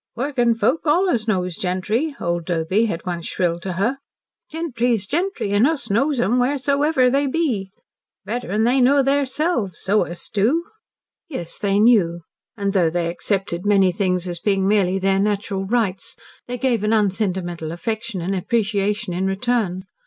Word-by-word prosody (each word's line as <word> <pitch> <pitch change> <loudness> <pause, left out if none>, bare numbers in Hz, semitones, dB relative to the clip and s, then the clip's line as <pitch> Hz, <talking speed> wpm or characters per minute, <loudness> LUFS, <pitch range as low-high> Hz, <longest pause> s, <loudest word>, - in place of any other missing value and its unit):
"Workin' 245 -2 +1
folk 255 +6 +1
allus 295 - +2
knows 180 -4 0
gentry," 210 - -1
old 170 -1 -2
Doby 175 +6 +1
had 165 -6 -4
once 175 -2 -4
shrilled 170 -2 -1
to 185 +1 -4
her. 230 +10 -1 0.5
"Gentry's 245 - -1
gentry, 335 - -2
an' 205 +5 +4
us 275 -9 -2
knows 275 +6 +1
'em 245 +2 +2
wheresoever 280 +1 +2
they 280 +2 +2
be. 260 - -1 0.6
Better'n 220 -2 -1
they 250 +3 +3
know 275 +2 +4
theirselves. 275 - 0
So 205 +3 +1
us 175 - -7
do!" 240 +12 +1 0.7
Yes, 175 - -6
they 200 -1 +1
knew. 205 -7 +4 0.4
And 200 -1 -1
though 180 -5 +3
they 170 0 -1
accepted 185 -1 -2
many 200 -3 +4
things 180 -1 0
as 175 -1 -4
being 195 0 +1
merely 195 -2 +2
their 195 0 +1
natural 200 -1 -1
rights, 225 -1 -1 0.3
they 245 0 -4
gave 240 -4 0
an 215 +1 +2
unsentimental 185 -6 -1
affection 220 +2 -4
and 190 +3 -2
appreciation 205 0 -1
in 185 +2 -1
return. 195 -2 -1
210 Hz, 155 wpm, -21 LUFS, 185-245 Hz, 0.7 s, an